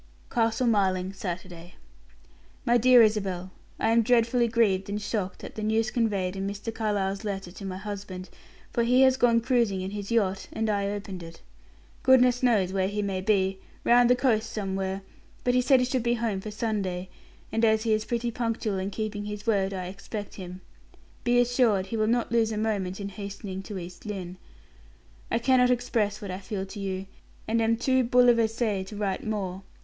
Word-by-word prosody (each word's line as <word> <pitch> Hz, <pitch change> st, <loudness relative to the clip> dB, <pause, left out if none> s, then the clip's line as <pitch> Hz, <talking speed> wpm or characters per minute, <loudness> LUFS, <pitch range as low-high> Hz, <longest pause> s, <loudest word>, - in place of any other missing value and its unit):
CASTLE 230 Hz, +2 st, +1 dB
MARLING, 190 Hz, -4 st, +1 dB
Saturday. 175 Hz, -2 st, -7 dB, 0.9 s
"MY 240 Hz, +1 st, +4 dB
DEAR 250 Hz, 0 st, +7 dB
ISABEL 195 Hz, -4 st, 0 dB, 0.3 s
I 225 Hz, -, +2 dB
am 230 Hz, +1 st, +5 dB
dreadfully 235 Hz, +1 st, +3 dB
grieved 210 Hz, -5 st, +2 dB
and 205 Hz, +1 st, -2 dB
shocked 205 Hz, -2 st, -3 dB
at -, -, -7 dB
the 215 Hz, -, -6 dB
news 220 Hz, +1 st, +1 dB
conveyed 200 Hz, -6 st, 0 dB
in 195 Hz, 0 st, -3 dB
Mr. 205 Hz, +3 st, -5 dB
Carlyle's 205 Hz, -2 st, -1 dB
letter 195 Hz, -3 st, -4 dB
to 195 Hz, +2 st, -9 dB
my 185 Hz, -1 st, -4 dB
husband, 195 Hz, -2 st, -6 dB, 0.5 s
for 235 Hz, -, +1 dB
he 250 Hz, +2 st, +4 dB
has 260 Hz, -1 st, +5 dB
gone 240 Hz, -3 st, +4 dB
cruising 235 Hz, -6 st, +1 dB
in 190 Hz, +1 st, -4 dB
his 205 Hz, -1 st, -5 dB
yacht, 195 Hz, -5 st, 0 dB
and 220 Hz, -1 st, -1 dB
I 200 Hz, -1 st, 0 dB
opened 200 Hz, -3 st, -5 dB
it. 165 Hz, 0 st, -11 dB, 0.6 s
Goodness 250 Hz, -1 st, +5 dB
knows 210 Hz, -7 st, +2 dB
where 190 Hz, -1 st, +1 dB
he 205 Hz, +1 st, -2 dB
may 195 Hz, -2 st, -2 dB
be, 190 Hz, -2 st, +1 dB, 0.2 s
round 245 Hz, 0 st, +5 dB
the 250 Hz, -, +6 dB
coast 225 Hz, -4 st, +1 dB
somewhere, 195 Hz, -1 st, -3 dB, 0.4 s
but 245 Hz, -, +2 dB
he 250 Hz, -, +4 dB
said 260 Hz, +1 st, +5 dB
he 250 Hz, -, +2 dB
should 255 Hz, 0 st, 0 dB
be 240 Hz, +1 st, +1 dB
home 220 Hz, -4 st, -2 dB
for 215 Hz, -, -6 dB
Sunday, 205 Hz, -4 st, -2 dB, 0.4 s
and 225 Hz, -, 0 dB
as 220 Hz, -1 st, +4 dB
he 225 Hz, -2 st, +2 dB
is 215 Hz, 0 st, +1 dB
pretty 235 Hz, 0 st, -1 dB
punctual 225 Hz, -4 st, -2 dB
in 190 Hz, +1 st, -2 dB
keeping 210 Hz, 0 st, -4 dB
his 210 Hz, 0 st, -6 dB
word, 200 Hz, -4 st, +1 dB
I 185 Hz, -2 st, -4 dB
expect 200 Hz, +2 st, -7 dB
him. 185 Hz, -1 st, -8 dB, 0.6 s
Be 245 Hz, 0 st, +3 dB
assured 240 Hz, -5 st, +3 dB
he 225 Hz, +4 st, -4 dB
will 215 Hz, 0 st, +2 dB
not 235 Hz, +1 st, +1 dB
lose 225 Hz, -1 st, +2 dB
a 215 Hz, -, -3 dB
moment 205 Hz, -4 st, -1 dB
in 200 Hz, -1 st, -4 dB
hastening 200 Hz, -1 st, -6 dB
to 195 Hz, +1 st, -7 dB
East 180 Hz, +3 st, -9 dB
Lynne. 185 Hz, -3 st, -5 dB, 0.9 s
"I -, -, +1 dB
cannot 250 Hz, +1 st, +4 dB
express 225 Hz, -4 st, 0 dB
what 195 Hz, -, -5 dB
I 185 Hz, -, -4 dB
feel 195 Hz, 0 st, -4 dB
for 200 Hz, +2 st, -9 dB
you, 190 Hz, -1 st, -3 dB, 0.4 s
and 230 Hz, +1 st, +1 dB
am 225 Hz, 0 st, +2 dB
too 260 Hz, +2 st, +2 dB
bouleversee 230 Hz, -4 st, +3 dB
to 210 Hz, -, -8 dB
write 200 Hz, -2 st, -2 dB
more. 195 Hz, -4 st, -3 dB
210 Hz, 190 wpm, -27 LUFS, 195-230 Hz, 0.9 s, DEAR